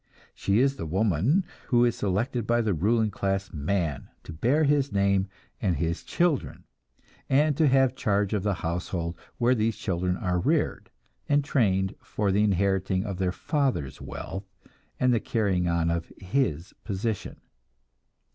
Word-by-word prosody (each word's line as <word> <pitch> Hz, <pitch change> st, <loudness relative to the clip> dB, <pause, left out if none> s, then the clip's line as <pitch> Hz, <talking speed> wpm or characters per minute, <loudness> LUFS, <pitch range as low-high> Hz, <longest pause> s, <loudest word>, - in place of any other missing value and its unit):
She 100 Hz, +1 st, 0 dB
is 135 Hz, +3 st, +3 dB
the 80 Hz, -, -4 dB
woman 105 Hz, -, +2 dB, 0.2 s
who 120 Hz, -1 st, +4 dB
is 120 Hz, -1 st, +1 dB
selected 110 Hz, +4 st, -1 dB
by 120 Hz, 0 st, +3 dB
the 110 Hz, -3 st, +1 dB
ruling 110 Hz, +6 st, +2 dB
class 95 Hz, -1 st, -2 dB
man 80 Hz, -2 st, -2 dB
to -, -, -8 dB
bear 125 Hz, -, +2 dB
his 140 Hz, -1 st, +2 dB
name 100 Hz, -1 st, +2 dB, 0.3 s
and 95 Hz, -4 st, +1 dB
his 80 Hz, +3 st, -1 dB
children, 170 Hz, -5 st, 0 dB, 0.7 s
and 145 Hz, +2 st, +3 dB
to 155 Hz, +1 st, +3 dB
have 135 Hz, -1 st, +3 dB
charge 100 Hz, -3 st, 0 dB
of 105 Hz, -, +1 dB
the 100 Hz, 0 st, 0 dB
household 85 Hz, 0 st, -2 dB, 0.2 s
where 120 Hz, +1 st, +3 dB
these 110 Hz, -2 st, 0 dB
children 90 Hz, -1 st, -1 dB
are 90 Hz, -1 st, 0 dB
reared, -, -, 0 dB, 0.4 s
and 145 Hz, 0 st, +3 dB
trained 95 Hz, -9 st, +1 dB
for 105 Hz, -2 st, -1 dB
the 100 Hz, +2 st, +3 dB
inheriting 95 Hz, -1 st, +1 dB
of 100 Hz, -4 st, -5 dB
their 95 Hz, -1 st, +1 dB
father's 130 Hz, -, -1 dB
wealth 95 Hz, 0 st, -7 dB, 0.5 s
and 125 Hz, -1 st, +3 dB
the 115 Hz, -, +3 dB
carrying 100 Hz, -6 st, 0 dB
on 85 Hz, -1 st, +1 dB
of 85 Hz, 0 st, -3 dB
his 90 Hz, -, -1 dB
position. 105 Hz, 0 st, -3 dB
100 Hz, 155 wpm, -27 LUFS, 90-120 Hz, 0.7 s, who